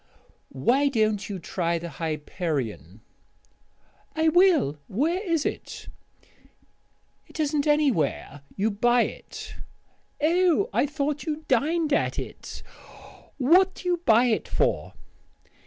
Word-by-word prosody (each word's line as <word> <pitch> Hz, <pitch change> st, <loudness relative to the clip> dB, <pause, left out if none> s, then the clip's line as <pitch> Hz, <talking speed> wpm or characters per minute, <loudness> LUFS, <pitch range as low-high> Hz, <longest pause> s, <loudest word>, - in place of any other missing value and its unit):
"Why 250 Hz, -, +2 dB
don't 215 Hz, -5 st, 0 dB
you 200 Hz, -, -4 dB
try 170 Hz, -1 st, -2 dB
the 170 Hz, +1 st, -6 dB
Hyperion?" 145 Hz, -, -4 dB, 1.1 s
"I 320 Hz, 0 st, +3 dB
will. 315 Hz, -, +3 dB
Where 320 Hz, -, 0 dB
is 335 Hz, -6 st, 0 dB
it?" -, -, -5 dB, 1.4 s
"It -, -, -12 dB
isn't 300 Hz, -1 st, 0 dB
anywhere; 235 Hz, -, +1 dB
you 210 Hz, +3 st, 0 dB
buy 240 Hz, +4 st, +3 dB
it." -, -, -8 dB, 0.6 s
"Oh, 355 Hz, +7 st, +2 dB
I -, -, +2 dB
thought 295 Hz, 0 st, -3 dB
you 310 Hz, -1 st, -4 dB
dined 305 Hz, +4 st, +1 dB
at -, -, 0 dB
it. -, -, -7 dB, 0.7 s
What 360 Hz, +8 st, +4 dB
do 360 Hz, -, -5 dB
you 350 Hz, -1 st, 0 dB
buy 230 Hz, -1 st, +5 dB
it 230 Hz, -3 st, 0 dB
for?" -, -, -1 dB
275 Hz, 115 wpm, -25 LUFS, -, 1.4 s, buy